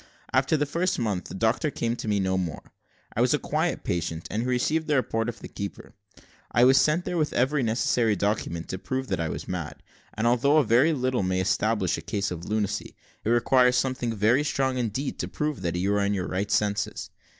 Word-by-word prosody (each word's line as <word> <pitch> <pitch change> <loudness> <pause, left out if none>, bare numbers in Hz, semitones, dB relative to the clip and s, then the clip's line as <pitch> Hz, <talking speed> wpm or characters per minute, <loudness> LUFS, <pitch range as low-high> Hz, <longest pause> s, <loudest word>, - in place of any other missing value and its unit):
After 135 +4 +3
the 145 - +1
first 170 +5 0
month, 105 -7 -1
the - - -8
doctor 115 - +1
came 120 -3 -2
to - - -6
me 105 -1 +1
no 95 -1 0
more: 90 -4 -3 0.5
I - - +1
was - - +4
a - - +1
quiet - - -1
patient, 85 -1 -3
and 105 - -1
he 125 - -2
received 155 +6 +1
the 150 - +2
report 115 -3 0
of 120 - -8
the - - -7
keeper. 100 -1 -7 0.6
I 120 - +4
was 135 +1 +6
sent 160 +4 +1
there 175 - -1
with 150 - 0
every 135 +3 +2
necessary 115 -1 +1
document 100 -4 -2
to 95 - -4
prove 130 +5 -3
that - - -1
I 80 -1 -1
was - - -5
mad; 90 -4 -5 0.3
and, 110 - -1
although 125 +5 +4
a 155 - +5
very 125 +7 +4
little 130 -3 0
may 95 -1 0
establish 95 -1 +1
a - - -8
case 100 +4 -2
of 85 -1 -6
lunacy, 105 -2 -2 0.3
it - - -1
requires 125 +1 +4
something 125 -3 0
very 115 +7 +3
strong 135 -3 0
indeed, 125 +4 -2
to - - -2
prove 150 -1 -3
that 85 0 -2
you 95 +3 +1
are 100 - +2
in 100 +1 +1
your 90 -2 -2
right 100 +2 -2
senses. 105 0 -1
115 Hz, 220 wpm, -26 LUFS, 100-130 Hz, 0.6 s, was